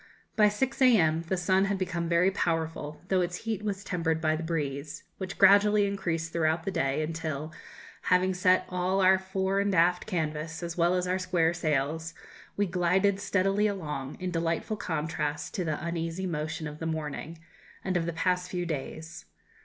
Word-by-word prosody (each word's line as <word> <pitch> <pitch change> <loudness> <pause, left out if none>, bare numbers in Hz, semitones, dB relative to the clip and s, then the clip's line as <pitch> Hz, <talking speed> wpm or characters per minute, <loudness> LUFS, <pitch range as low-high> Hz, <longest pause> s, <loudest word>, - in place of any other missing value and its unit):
By 210 -1 +5
6 260 +6 -2
a.m. 170 -11 +5
the 190 - 0
sun 185 +2 +2
had 200 0 0
become 175 -3 -2
very 175 +3 +4
powerful, 160 -4 -2
though 190 -1 +3
its 175 0 -1
heat 220 -2 -2
was 200 -2 -3
tempered 165 -4 -1
by 155 -1 +1
the 155 - -4
breeze, 150 -2 -3 0.2
which 190 -1 -5
gradually 205 +1 +6
increased 170 -5 -2
throughout 160 0 +1
the 195 - -2
day, 135 -1 0
until, 155 -1 -4 0.5
having 185 +1 +3
set 185 0 +3
all 180 +1 0
our 190 0 +5
fore 190 +1 -1
and 200 -1 +1
aft 175 +1 +3
canvas, 160 -3 -3
as 170 0 -4
well 175 +1 +3
as 180 0 0
our 185 +1 0
square 175 -3 +1
sails, 160 0 -1 0.4
we 205 - +2
glided 185 +2 +2
steadily 200 +1 +1
along, 150 -9 -4
in 185 -1 -3
delightful 165 +5 -1
contrast 150 -4 -3
to 185 - -1
the 155 -1 -3
uneasy 170 +2 -3
motion 155 -2 -3
of 150 0 -7
the 165 - -3
morning, 160 +1 -4 0.5
and 190 -1 -1
of 170 -1 0
the 170 - -2
past 180 +2 0
few 180 -1 -2
days. 160 - -6
170 Hz, 175 wpm, -28 LUFS, 160-190 Hz, 0.5 s, gradually